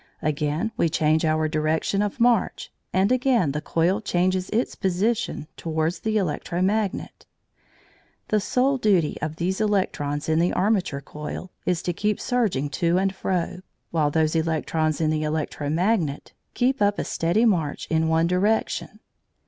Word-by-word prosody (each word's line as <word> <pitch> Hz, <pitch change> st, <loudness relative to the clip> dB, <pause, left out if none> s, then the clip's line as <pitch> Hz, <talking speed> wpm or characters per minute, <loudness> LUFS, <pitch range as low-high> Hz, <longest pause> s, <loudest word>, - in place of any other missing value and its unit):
Again 150 Hz, +7 st, -1 dB
we 165 Hz, -, +2 dB
change 155 Hz, 0 st, +2 dB
our 155 Hz, 0 st, +2 dB
direction 155 Hz, +5 st, 0 dB
of 210 Hz, +3 st, -2 dB
march, 235 Hz, -3 st, +2 dB, 0.2 s
and 190 Hz, +4 st, +2 dB
again 250 Hz, -, +2 dB
the 150 Hz, +2 st, -3 dB
coil 175 Hz, +8 st, +1 dB
changes 185 Hz, -1 st, 0 dB
its 230 Hz, +4 st, 0 dB
position 195 Hz, -2 st, -1 dB
towards 160 Hz, +1 st, -1 dB
the 220 Hz, 0 st, 0 dB
electro 175 Hz, -2 st, -2 dB
magnet. 205 Hz, 0 st, -1 dB, 1.0 s
The 215 Hz, -, +3 dB
sole 260 Hz, +6 st, +1 dB
duty 190 Hz, -9 st, +2 dB
of 155 Hz, +1 st, -3 dB
these 185 Hz, +5 st, -1 dB
electrons 150 Hz, -8 st, 0 dB
in 160 Hz, 0 st, +2 dB
the 175 Hz, +1 st, +2 dB
armature 185 Hz, -7 st, +1 dB
coil 150 Hz, +6 st, -7 dB, 0.2 s
is 180 Hz, -2 st, 0 dB
to 175 Hz, -, -1 dB
keep 210 Hz, +3 st, -1 dB
surging 215 Hz, -, 0 dB
to 170 Hz, +1 st, +3 dB
and 190 Hz, 0 st, +1 dB
fro, 180 Hz, -2 st, -2 dB, 0.3 s
while 155 Hz, -3 st, +2 dB
those 155 Hz, +1 st, +1 dB
electrons 160 Hz, -1 st, 0 dB
in 155 Hz, -1 st, +2 dB
the 155 Hz, -1 st, 0 dB
electro 150 Hz, -1 st, -2 dB
magnet 170 Hz, -3 st, 0 dB, 0.2 s
keep 260 Hz, +1 st, +1 dB
up 205 Hz, 0 st, +3 dB
a -, -, -1 dB
steady 175 Hz, +8 st, +1 dB
march 170 Hz, -10 st, 0 dB
in 160 Hz, 0 st, +2 dB
one 160 Hz, +1 st, +3 dB
direction. 190 Hz, +5 st, 0 dB
175 Hz, 155 wpm, -24 LUFS, 155-205 Hz, 1.0 s, The